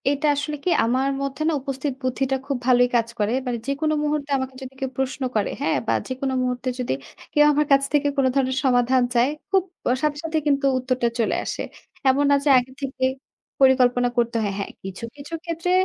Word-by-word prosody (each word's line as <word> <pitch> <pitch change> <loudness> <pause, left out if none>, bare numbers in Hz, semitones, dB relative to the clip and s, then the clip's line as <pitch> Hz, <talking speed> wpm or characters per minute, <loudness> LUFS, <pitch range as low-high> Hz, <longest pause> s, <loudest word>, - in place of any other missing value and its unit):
এটা 285 +2 0
আসলে 295 +1 -3
কি? - - 0 0.2
আমার 255 +3 +1
মধ্যে 275 +2 -4
না - - +1
উপস্থিত 270 +1 -3
বুদ্ধিটা 260 +1 0
খুব 280 -2 -1
ভালোই 245 -1 +5
কাজ 230 -1 +2
করে। 210 +2 +1
মানে 245 -1 -1
যেকোনো 300 +3 0
মুহূর্তে 295 -1 -1
আমাকে 260 0 -4
যদি 265 0 -8
কেউ 265 - -2
প্রশ্ন 265 +1 -2
করে, 210 - +1
হ্যাঁ? 290 - +1
বা - - +2
যেকোনো 260 +1 -2
মুহূর্তে 250 0 -2
যদি 250 - -1 0.4
কেউ 295 0 +6
আমার 300 +1 +2
কাছ 275 0 +6
থেকে 290 0 +3
কোন 275 - +3
ধরনের 260 -1 +1
সমাধান 250 0 +3
চায়, 240 +2 +3 0.2
খুব 385 -2 +4 0.3
অ - - +4
সাথে 300 -1 +1
সাথেই 320 -1 -1
কিন্তু 275 -1 +2
উত্তরটা 255 -1 0
চলে 230 - +1
আসে। - - -3 0.5
এমন 280 +2 +3
না - - +6
যে - - +3
আগে 250 +1 -1
থেকে 265 -1 -4 0.6
পরিকল্পনা 250 -2 +4
করতে 235 -1 +1
হয়। 200 -2 -1
হ্যাঁ, 200 - -4
কিছু, 190 +3 -7
কিছু 290 +3 -10
ক্ষেত্রে 335 +1 -2
265 Hz, 200 wpm, -23 LUFS, 250-285 Hz, 0.6 s, কেউ